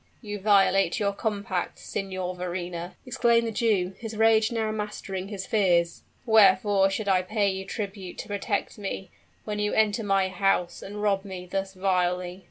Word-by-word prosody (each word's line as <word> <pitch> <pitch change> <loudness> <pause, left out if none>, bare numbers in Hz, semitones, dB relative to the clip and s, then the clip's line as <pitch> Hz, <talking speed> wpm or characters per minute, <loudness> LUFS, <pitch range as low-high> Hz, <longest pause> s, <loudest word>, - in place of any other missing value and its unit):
"You 205 -3 -6
violate 195 -3 +3
your 200 -1 +1
compact, 200 -4 -2
Signor 185 -2 -4
Verrina!" 180 -1 -5
exclaimed 235 -2 +2
the 225 - -2
Jew, 205 -5 +1
his 225 -1 -6
rage 220 0 +4
now 220 -2 -1
mastering 210 -3 -4
his 195 -2 -5
fears. 175 -5 +2 0.2
"Wherefore 205 -3 +5
should 205 +2 -3
I 190 -2 +4
pay 205 +1 0
you 190 0 -5
tribute 195 -4 -6
to - - -6
protect 205 +1 -2
me, 195 -2 -5 0.3
when 210 -1 -3
you 210 0 0
enter 220 +1 +2
my 195 -2 +2
house 185 -2 0
and 205 +1 -6
rob 195 -2 +2
me 190 -3 -7
thus 195 +1 -3
vilely?" 180 -1 0
195 Hz, 165 wpm, -26 LUFS, 185-210 Hz, 0.3 s, Wherefore